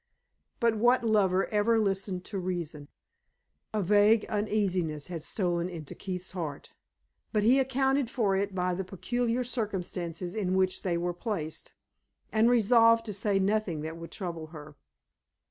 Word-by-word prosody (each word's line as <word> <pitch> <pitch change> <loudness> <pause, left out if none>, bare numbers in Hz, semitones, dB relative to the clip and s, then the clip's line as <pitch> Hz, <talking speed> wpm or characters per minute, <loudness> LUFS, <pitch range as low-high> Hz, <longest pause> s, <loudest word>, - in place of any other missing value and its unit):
But 230 -2 +2
what 240 +3 +4
lover 195 -4 +3
ever 220 +2 +2
listened 195 -3 -1
to 200 - -4
reason? 170 -5 -4 0.8
A 215 -2 -1
vague 210 +3 +4
uneasiness 190 -8 -1
had 170 -3 -5
stolen 175 0 -1
into 160 -5 -8
Keith's 185 -1 -5
heart; 160 -6 -6 0.6
but 210 -2 +1
he 250 +5 +5
accounted 265 0 +1
for 215 -7 +1
it 195 0 -1
by 180 0 0
the 190 +2 -2
peculiar 240 +6 -1
circumstances 180 -7 -3
in 190 -4 -1
which 185 -1 +1
they 175 -3 0
were 175 +1 -1
placed, 175 -5 -5 0.6
and 220 +2 +4
resolved 230 0 +5
to 210 - -4
say 200 0 0
nothing 195 -5 0
that 160 +1 -5
would 165 -1 -9
trouble 170 -4 -5
her. 155 -2 -11
195 Hz, 145 wpm, -29 LUFS, 175-220 Hz, 0.8 s, he